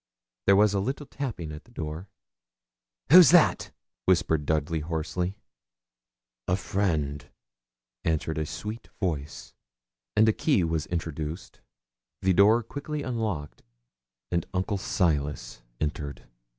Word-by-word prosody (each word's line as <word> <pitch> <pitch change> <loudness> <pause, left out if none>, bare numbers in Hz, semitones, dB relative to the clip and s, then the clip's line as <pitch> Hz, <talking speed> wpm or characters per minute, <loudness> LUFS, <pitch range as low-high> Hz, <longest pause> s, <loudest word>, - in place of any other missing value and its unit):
There 100 - +7
was 105 0 +5
a 100 - +1
little 135 +8 -3
tapping 115 - -5
at 75 +1 -9
the 120 - -21
door. 80 -1 -6 1.0
'Who's 180 -2 +10
that?' 175 -2 +5 0.4
whispered 80 -5 +2
Dudley, 80 +1 0
hoarsely. 85 +4 -3 1.1
'A 90 - +2
friend,' 80 -8 -1 0.7
answered 80 0 -1
a 80 - -2
sweet 110 +8 -6
voice. 80 -6 -3 0.6
And 110 - +5
a 110 - +5
key 135 - +2
was 80 -2 -1
introduced, 80 -1 -5 0.6
the 95 0 +2
door 105 +5 +5
quickly 145 +5 -5
unlocked, 110 - -3 0.7
and 85 -1 0
Uncle 95 +2 -1
Silas 75 -10 -1 0.2
entered. 75 -2 -4
90 Hz, 115 wpm, -27 LUFS, 75-105 Hz, 1.1 s, Who's